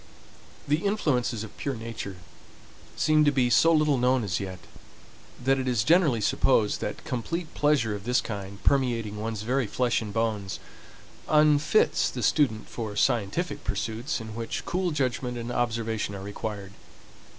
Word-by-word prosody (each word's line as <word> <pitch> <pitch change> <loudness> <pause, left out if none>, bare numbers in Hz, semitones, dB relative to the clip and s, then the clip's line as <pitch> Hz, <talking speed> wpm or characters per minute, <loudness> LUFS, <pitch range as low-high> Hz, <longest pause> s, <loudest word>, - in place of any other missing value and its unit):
The 150 +1 +3
influences 145 - 0
of 110 - -10
pure 140 -2 -3
nature 110 -4 -6 0.8
seem 155 0 +3
to 145 - +4
be 125 -3 +2
so 165 +9 +5
little 150 -4 +3
known 125 0 +2
as 90 -5 -1
yet, 95 -2 -5 0.9
that 135 +1 +3
it 130 - -2
is 120 -4 +2
generally 150 -5 +4
supposed 105 0 +2
that - - -5
complete 155 +7 -3
pleasure 145 -7 +2
of 100 -1 -6
this 125 +3 +2
kind, 100 -2 -6
permeating 120 -6 +1
one's 110 -1 -4
very 125 +1 0
flesh 125 +3 0
and 105 -2 -5
bones, 105 -3 -2 0.7
unfits 150 +5 +4
the 125 - -5
student 125 -8 +2
for 110 -3 -5
scientific 120 - 0
pursuits 115 +7 -2
in 110 -1 -8
which 115 +1 -4
cool 180 +1 0
judgment 125 -4 -1
and 120 +1 -5
observation 115 -4 -1
are 95 - -7
required. 100 -1 -6
120 Hz, 150 wpm, -27 LUFS, 110-140 Hz, 0.9 s, so